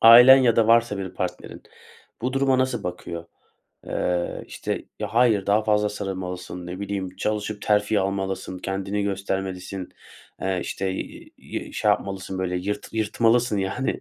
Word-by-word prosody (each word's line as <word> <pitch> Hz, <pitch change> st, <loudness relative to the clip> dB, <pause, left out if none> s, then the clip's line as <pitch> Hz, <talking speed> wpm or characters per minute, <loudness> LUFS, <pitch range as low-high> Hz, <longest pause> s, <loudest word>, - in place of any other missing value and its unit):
ailen 120 Hz, +3 st, +10 dB
ya 125 Hz, -4 st, +4 dB
da 115 Hz, -1 st, +4 dB
varsa 115 Hz, -3 st, +4 dB
bir 95 Hz, -2 st, -4 dB
partnerin, -, -, -5 dB, 0.6 s
bu 125 Hz, -, 0 dB
duruma 135 Hz, -1 st, +3 dB
nasıl 130 Hz, 0 st, 0 dB
bakıyor? 85 Hz, -1 st, -5 dB, 0.6 s
Eee, 90 Hz, -1 st, -1 dB
işte, -, -, -4 dB, 0.2 s
ya, -, -, -4 dB
hayır, 115 Hz, -5 st, +4 dB
daha 105 Hz, +2 st, +3 dB
fazla 105 Hz, -1 st, +2 dB
sarılmalısın, 90 Hz, -3 st, -5 dB
ne 90 Hz, +2 st, -6 dB
bileyim, 95 Hz, -2 st, -4 dB
çalışıp 105 Hz, 0 st, -2 dB
terfi 105 Hz, 0 st, +2 dB
almalısın, 95 Hz, -1 st, -2 dB
kendini 95 Hz, +2 st, -2 dB
göstermelisin, 95 Hz, -1 st, -3 dB, 0.5 s
eee, 95 Hz, -1 st, 0 dB
işte, 95 Hz, -1 st, -2 dB
iii, -, -, -7 dB
şey -, -, +2 dB
yapmalısın, 95 Hz, -1 st, -2 dB
böyle, 90 Hz, -1 st, -1 dB
yırt 100 Hz, +3 st, -3 dB
yırtmalısın, 115 Hz, +1 st, +2 dB
yani, 95 Hz, +7 st, -1 dB
100 Hz, 140 wpm, -24 LUFS, 95-110 Hz, 0.6 s, ailen